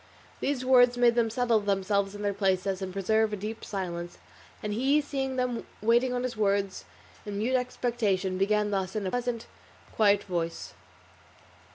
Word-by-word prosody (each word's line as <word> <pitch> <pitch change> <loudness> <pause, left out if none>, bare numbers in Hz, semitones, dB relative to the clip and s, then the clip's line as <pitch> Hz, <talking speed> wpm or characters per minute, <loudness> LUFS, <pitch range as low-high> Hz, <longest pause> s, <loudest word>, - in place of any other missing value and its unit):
These 270 -2 -1
words 245 -1 +5
made 240 -1 +5
them 230 -1 +2
settle 235 -1 +2
themselves 200 0 0
in 205 - -6
their 205 -1 0
places 190 -1 0
and 190 -1 -4
preserve 215 +3 +1
a - - -1
deep 215 +3 -6
silence, 175 -3 -5 0.5
and 210 -1 -2
he 270 +7 +3
seeing 270 -3 -3
them 250 -2 -2
waiting 235 +4 +3
on 250 0 -1
his 255 -2 -3
words 200 -2 0 0.4
in 205 -1 -5
mute 230 +5 0
expectation, 225 -7 -1
began 210 +1 +2
thus 190 -1 -2
in 210 -2 -2
a 185 - -2
pleasant 245 -2 -2 0.5
quiet 205 -2 +4
voice. 170 -3 -4
210 Hz, 165 wpm, -28 LUFS, 195-245 Hz, 0.5 s, words